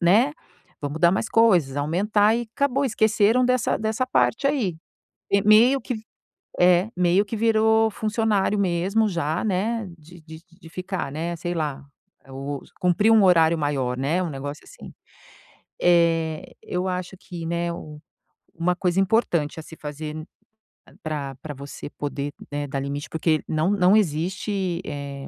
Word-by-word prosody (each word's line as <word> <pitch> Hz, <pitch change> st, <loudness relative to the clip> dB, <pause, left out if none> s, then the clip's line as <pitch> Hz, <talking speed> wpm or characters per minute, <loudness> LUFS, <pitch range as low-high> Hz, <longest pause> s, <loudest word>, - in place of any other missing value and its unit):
né, 215 Hz, +12 st, +4 dB, 0.5 s
vamos 145 Hz, +2 st, -4 dB
dar 170 Hz, -1 st, +6 dB
mais 205 Hz, -, -1 dB
coisas, 180 Hz, -12 st, +3 dB
aumentar", 205 Hz, +8 st, +2 dB
e 240 Hz, -, -1 dB
acabou, 280 Hz, 0 st, +1 dB
esqueceram 220 Hz, +1 st, +3 dB
dessa 255 Hz, -1 st, +1 dB
dessa 220 Hz, +4 st, -1 dB
parte 255 Hz, +1 st, +1 dB
aí. 220 Hz, -, -1 dB, 0.6 s
Eh, 200 Hz, 0 st, +4 dB
meio 235 Hz, +6 st, +5 dB
que 250 Hz, -, -4 dB, 0.6 s
é, 180 Hz, +3 st, +4 dB
meio 180 Hz, +3 st, +3 dB
que 225 Hz, -, -5 dB
virou 220 Hz, 0 st, +3 dB
funcionário 210 Hz, -1 st, 0 dB
mesmo 195 Hz, +4 st, +1 dB
já, 165 Hz, -2 st, -2 dB
né, 215 Hz, +2 st, -1 dB
de 165 Hz, +2 st, -16 dB
de 160 Hz, 0 st, -11 dB, 0.2 s
de 165 Hz, -, -12 dB
ficar, 185 Hz, -4 st, -4 dB
né, 170 Hz, +3 st, -3 dB
sei 175 Hz, +1 st, -4 dB
lá, 150 Hz, -4 st, -3 dB, 0.4 s
eh, 135 Hz, -, -15 dB
o 140 Hz, +1 st, -5 dB, 0.2 s
cumprir 180 Hz, +5 st, +3 dB
um 220 Hz, -3 st, +6 dB
horário 165 Hz, -3 st, +5 dB
maior, 135 Hz, -4 st, -1 dB
né, 150 Hz, +8 st, 0 dB
um 175 Hz, -, -2 dB
negócio 145 Hz, +1 st, -6 dB
assim. -, -, -13 dB, 0.9 s
Eh, 165 Hz, -2 st, +2 dB
eu 180 Hz, +1 st, -3 dB
acho 180 Hz, +1 st, -4 dB
que, 170 Hz, -2 st, -8 dB
né, 170 Hz, +1 st, -1 dB
u 150 Hz, -2 st, -9 dB, 0.5 s
uma 175 Hz, +2 st, 0 dB
coisa 185 Hz, 0 st, +1 dB
importante 175 Hz, -7 st, +1 dB
a -, -, -9 dB
se 160 Hz, -, -12 dB
fazer 150 Hz, +1 st, -6 dB
n 155 Hz, 0 st, -7 dB, 0.8 s
pra 145 Hz, -3 st, -4 dB
pra 150 Hz, -, -6 dB
você 140 Hz, +1 st, -9 dB
poder, 145 Hz, -1 st, -5 dB, 0.2 s
né, 145 Hz, 0 st, -3 dB
dar 140 Hz, 0 st, -3 dB
limite 140 Hz, +1 st, -4 dB
porque 160 Hz, -1 st, 0 dB
não 160 Hz, +5 st, +1 dB
não 195 Hz, 0 st, +4 dB
existe, 185 Hz, +1 st, -1 dB
eh, 140 Hz, -1 st, -6 dB
175 Hz, 155 wpm, -24 LUFS, 155-210 Hz, 0.9 s, dar